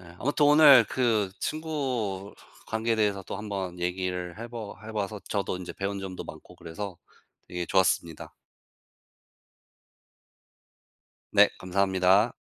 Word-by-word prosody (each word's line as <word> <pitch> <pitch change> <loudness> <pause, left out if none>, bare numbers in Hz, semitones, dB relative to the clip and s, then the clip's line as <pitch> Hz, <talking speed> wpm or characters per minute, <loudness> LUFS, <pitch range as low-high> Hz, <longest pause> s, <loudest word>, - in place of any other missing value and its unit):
예. - - -15
아무튼 145 +2 +2
오늘 145 -4 +8
그 110 -6 +1
친구 130 -11 -3 0.3
관계에 110 +1 -1
대해서 105 -3 +1
또 - - -6
한번 100 -4 -5
얘기를 90 0 -3
해 115 +1 -7
봐 115 -3 -7
해 110 - -7
봐서 105 -1 -3
저도 100 -3 -1
인제 90 - -7
배운 100 0 -3
점도 95 -1 -6
많고 - - -12
그래서 90 +3 -7 0.5
되게 90 -1 -4
좋았습니다. 85 -4 0 3.0
네 - - +6
감사합니다. 95 +3 +2
100 Hz, 250 characters per minute, -27 LUFS, 95-115 Hz, 3.0 s, 오늘